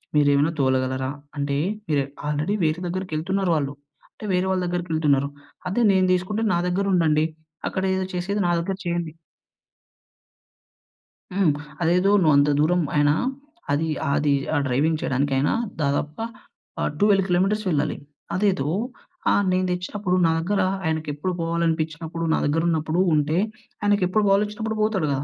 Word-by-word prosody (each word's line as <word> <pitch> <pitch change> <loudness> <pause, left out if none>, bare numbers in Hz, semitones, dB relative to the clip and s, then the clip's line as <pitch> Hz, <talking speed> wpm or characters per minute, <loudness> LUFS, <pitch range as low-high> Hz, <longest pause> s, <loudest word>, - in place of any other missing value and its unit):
మీరేమైనా 145 +1 +4
తోలగలరా? 130 0 +1 0.3
అంటే 140 0 -1 0.3
మీరు 145 -2 +2 0.2
ఆల్రెడీ 150 +6 0
వేరే 155 +1 +1
దగ్గరికి 185 -1 -4
యెళ్తున్నారు 190 +3 0
వాళ్ళు. 140 -2 -1 0.4
అంటే - - -11
వేరే 180 +1 +2
వాళ్ళ 185 -1 +1
దగ్గరికి 175 0 -3
యెళ్తున్నారు. 140 -3 +2 0.4
అదే 200 +6 0
నేను 190 -1 +3
దీసుకుంటే 190 +5 -1
నా 170 - +2
దగ్గర 185 +3 0
ఉండండి, 155 -3 +3 0.4
అక్కడేదో 190 0 -1
చేసేది 195 +4 -1
నా - - +2
దగ్గర 190 +3 -2
చేయండి. 170 -2 -2 2.2
హ్మ్. 185 -4 +3 0.3
అదేదో 180 +4 +3
నువ్వు 155 -4 +4
అంత 145 +1 +4
దూరం 175 +4 +3
అయినా 145 0 +4 0.6
అది 150 +3 +1 0.2
ఆహ్, 140 - +1
అది 145 0 +2 0.2
ఆ - - +3
డ్రైవింగ్ 150 +5 +1
చేయడానికి 135 +2 0
ఆయన 135 +2 +2 0.3
దాదాపుగా 150 +7 -1 0.6
ఆహ్, - - +1
12 200 -2 +4
కిలోమీటర్స్ 195 +4 +1
వెళ్ళాలి. 150 -4 0 0.4
అదేదో 185 -7 +1 0.6
ఆహ్, 205 - +3
నేను 185 0 +1
దెచ్చినప్పుడు 180 +1 -2
నా 165 - +4
దగ్గర 200 +5 0 0.2
ఆయనకి 160 -1 -1
ఎప్పుడు 165 +6 -3
పోవాలనిపిచ్చినప్పుడు, 165 0 -1
నా - - +2
దగ్గరున్నప్పుడు 160 +2 +1
ఉంటే 150 +2 +1 0.4
ఆయనకెప్పుడు 205 0 +2
బోవాలొచ్చినప్పుడు 210 +2 +1
పోతాడు 200 -7 +1
గదా. 135 +1 -2
170 Hz, 140 wpm, -23 LUFS, 150-190 Hz, 2.2 s, మీరేమైనా